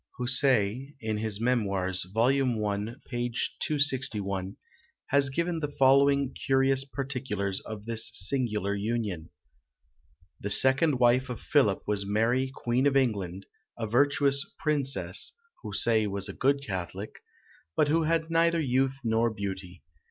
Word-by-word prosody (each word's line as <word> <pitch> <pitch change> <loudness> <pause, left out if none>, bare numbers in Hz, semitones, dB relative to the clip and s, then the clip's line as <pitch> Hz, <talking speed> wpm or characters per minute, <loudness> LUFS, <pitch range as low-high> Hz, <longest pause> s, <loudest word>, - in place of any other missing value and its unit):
Houssaie, 125 0 +1
in 110 -2 -2
his 110 -1 -2
Mémoires, 100 -7 0
vol. 115 +4 +3
i. 115 -5 0
p. 120 -1 -2 0.3
261, 110 -10 -1 0.5
has 140 -1 +3
given 170 +4 -1
the 150 - -2
following 140 -1 +3
curious 135 0 +2
particulars 125 -8 -3
of 105 -1 -8
this 115 -1 -1
singular 110 -5 -1
union: 100 -5 -3 1.1
"The 100 - -4
second 130 +6 +4
wife 125 +2 +3
of 125 - -5
Philip 120 -10 +2
was 105 -1 -1
Mary 115 +6 +1
Queen 125 +1 0
of 140 -1 +3
England; 100 -7 -1 0.3
a 115 - -3
virtuous 140 +4 +2
princess 135 - -2 0.3
(Houssaie 110 +1 +2
was 100 0 -2
a 95 - -6
good 140 +4 +1
catholic), 95 +1 -5 0.6
but 150 - +3
who 160 +3 +2
had 160 0 0
neither 165 0 +3
youth 135 -2 +1
nor 115 0 +2
beauty. 95 -4 -6
120 Hz, 130 wpm, -28 LUFS, 105-135 Hz, 1.1 s, second